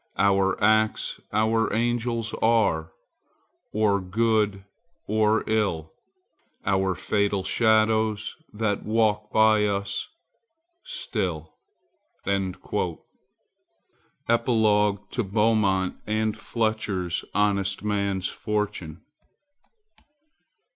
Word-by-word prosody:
Our 95 -1 +2
acts 110 +1 +2
our 110 +1 +1
angels 115 0 -1
are, 100 -9 +2 0.8
or 105 -2 +2
good 105 0 +1 0.4
or 110 +1 +2
ill, 100 -8 -1 0.7
Our 95 -1 +1
fatal 100 +1 0
shadows 110 -1 +2 0.2
that 105 -1 -1
walk 105 -1 0
by 110 -1 +4
us 100 -1 -2 0.8
still." 85 -8 -4 0.7
_Epilogue 95 -2 -2 2.1
to 120 - -1
Beaumont 100 -2 +1
and 110 0 0
Fletcher's 105 -6 -2
Honest 100 -1 +1
Man's 100 -3 -1
Fortune. 105 -6 -3
105 Hz, 70 wpm, -25 LUFS, 95-110 Hz, 2.1 s, by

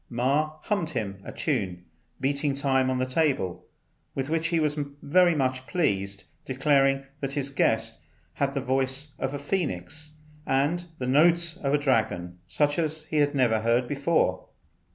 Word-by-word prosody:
Ma 140 +6 +1
hummed 200 -7 -1
him 100 - -4
a - - -7
tune, 90 -2 -2 0.3
beating 140 +1 0
time 135 -2 +2
on 130 - 0
the 130 - +1
table, 130 - 0 0.5
with 135 +1 -2
which 165 0 +1
he 165 0 +1
was 150 -2 +1 0.3
very 175 +3 +4
much 130 -2 -1
pleased, 100 - 0 0.2
declaring 135 0 +2
that 135 -1 -3
his 140 -1 -1
guest 135 - +2 0.3
had 140 0 -1
the 140 - 0
voice 135 +2 -1
of 135 +1 -2
a - - -2
phœnix 145 - -3 0.3
and 145 +6 +1
the 125 - -3
notes 165 +5 +4
of 140 - -1
a 145 - +4
dragon, 110 -11 0
such 145 +1 +1
as 155 -1 -1
he 155 - 0
had 145 0 +2
never 120 -5 +3
heard 120 +2 +2
before. 140 - +1
140 Hz, 160 wpm, -27 LUFS, 130-150 Hz, 0.5 s, very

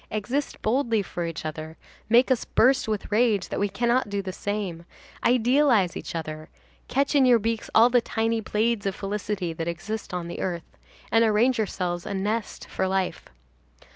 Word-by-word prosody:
Exist 245 +7 -2
boldly 230 -2 +1
for 175 -2 -4
each 165 -1 -6
other, 155 +1 -6 0.3
make 245 +4 +5
us 255 - +2
burst 260 +1 +3
with 215 -1 -3
rage 215 -3 +2
that - - -3
we 205 - +1
cannot 235 +3 +1
do 200 -1 -2
the 185 -1 -5
same, 195 -4 -3 0.4
idealize 245 -5 +3
each - - -6
other, 155 -1 -5 0.4
catch 275 +3 +1
in 285 -2 +5
your 250 -2 +6
beaks 225 0 -2
all 230 +2 +8
the 245 -1 +4
tiny 225 0 -1
blades 215 0 0
of 195 - -2
felicity 200 -3 -3
that 165 +1 -4
exist 195 +6 -4
on 175 -1 -4
earth, 175 -3 -4 0.4
and 225 0 +5
arrange 225 +3 +3
yourselves 180 -4 -2
a - - -3
nest 210 +3 -3
for 190 - -1
life. 190 -1 -1
210 Hz, 170 wpm, -25 LUFS, 185-235 Hz, 0.4 s, all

